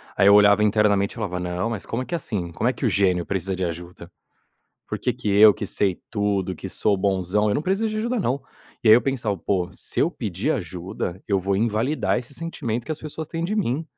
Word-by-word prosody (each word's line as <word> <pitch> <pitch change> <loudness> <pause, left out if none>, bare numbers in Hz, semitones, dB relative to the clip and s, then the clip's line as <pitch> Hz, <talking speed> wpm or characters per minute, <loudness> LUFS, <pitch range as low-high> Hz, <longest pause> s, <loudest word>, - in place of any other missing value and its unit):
Aí 100 - +4
eu 100 - +8
olhava 105 0 +6
internamente, 105 -1 +3
e - - -16
falava: 95 -6 -3
"Não, 90 +5 -2
mas 110 -5 -5
como 115 - -3
é 130 - -4
que 175 - -3
assim, 100 - -3
como 110 +8 -1
é 130 - +2
que - - -4
o - - +4
gênio 90 -4 +2
precisa 95 -1 -2
de 95 - -3
ajuda? 85 +1 -7 0.8
Por - - -4
que 125 - 0
que 115 -3 -5
eu, 105 +1 +7
que - - -5
sei 95 -3 0
tudo, 100 -3 -1
que - - -7
sou 105 -2 +1
bonzão? 95 +2 +1
Eu 105 - +1
não 150 - 0
preciso 195 +5 0
de 215 - -4
ajuda 235 +2 -1
não". 135 -5 0 0.4
E - - +4
aí 110 - +10
eu 120 - +4
pensava: 120 -7 -1
"Pô, 90 0 -1
se - - -4
eu - - +3
pedir - - -2
ajuda, 90 0 -5
eu 100 -2 +1
vou 95 +1 0
invalidar 115 +7 0
esse 125 +2 -8
sentimento 130 -9 -4
que 155 - -2
as 155 - -7
pessoas 155 0 -6
têm 165 +1 -4
de 210 +5 -1
mim". 160 - 0
105 Hz, 240 wpm, -23 LUFS, 95-125 Hz, 0.8 s, aí